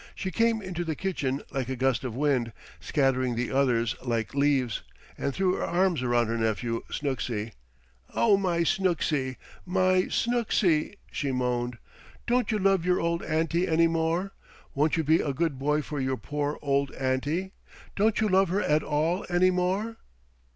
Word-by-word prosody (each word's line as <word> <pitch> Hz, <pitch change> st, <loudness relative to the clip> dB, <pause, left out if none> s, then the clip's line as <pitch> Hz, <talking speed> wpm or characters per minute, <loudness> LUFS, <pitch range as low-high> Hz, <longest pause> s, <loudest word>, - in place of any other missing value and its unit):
She 190 Hz, -, -4 dB
came 230 Hz, +1 st, +1 dB
into 180 Hz, -2 st, -3 dB
the 160 Hz, -2 st, -3 dB
kitchen 145 Hz, -8 st, -2 dB
like 130 Hz, -2 st, -2 dB
a 130 Hz, -, -2 dB
gust 130 Hz, -1 st, +1 dB
of 125 Hz, -3 st, -4 dB
wind, 130 Hz, -5 st, +1 dB, 0.3 s
scattering 130 Hz, -3 st, +1 dB
the 120 Hz, +1 st, -2 dB
others 120 Hz, -4 st, +2 dB
like 115 Hz, -3 st, -2 dB
leaves, 140 Hz, -5 st, +1 dB, 0.3 s
and 140 Hz, -, -2 dB
threw 185 Hz, +4 st, +1 dB
her -, -, -2 dB
arms 175 Hz, -3 st, +1 dB
around 120 Hz, -1 st, +2 dB
her 115 Hz, +1 st, -2 dB
nephew 115 Hz, +1 st, -1 dB
Snooksy. 120 Hz, -6 st, -3 dB, 0.6 s
"Oh, 220 Hz, -3 st, +5 dB
my 180 Hz, -4 st, 0 dB
Snooksy! 160 Hz, -8 st, 0 dB, 0.3 s
My 185 Hz, 0 st, +2 dB
Snooksy!" 215 Hz, -9 st, +1 dB, 0.2 s
she 140 Hz, -2 st, -2 dB
moaned. 125 Hz, -1 st, -1 dB, 0.5 s
"Don't 245 Hz, 0 st, +1 dB
you 215 Hz, -, +1 dB
love 195 Hz, -3 st, +2 dB
your 180 Hz, 0 st, +2 dB
old 170 Hz, 0 st, 0 dB
auntie 165 Hz, +3 st, 0 dB
any 165 Hz, 0 st, +4 dB
more? 165 Hz, +4 st, 0 dB, 0.4 s
Won't 150 Hz, +4 st, +1 dB
you 160 Hz, -, +1 dB
be 160 Hz, +2 st, +4 dB
a 140 Hz, -, -2 dB
good 160 Hz, -3 st, -1 dB
boy 150 Hz, +2 st, +1 dB
for 150 Hz, 0 st, -5 dB
your 130 Hz, 0 st, -1 dB
poor 145 Hz, +1 st, -3 dB
old 140 Hz, -1 st, +1 dB
auntie? 145 Hz, +8 st, -1 dB, 0.4 s
Don't 215 Hz, +1 st, +2 dB
you 220 Hz, -, +2 dB
love 190 Hz, -1 st, +3 dB
her 195 Hz, +3 st, 0 dB
at 150 Hz, +1 st, +2 dB
all 160 Hz, +5 st, 0 dB
any 180 Hz, +1 st, +4 dB
more?" 190 Hz, +5 st, -1 dB
155 Hz, 165 wpm, -27 LUFS, 130-185 Hz, 0.6 s, Oh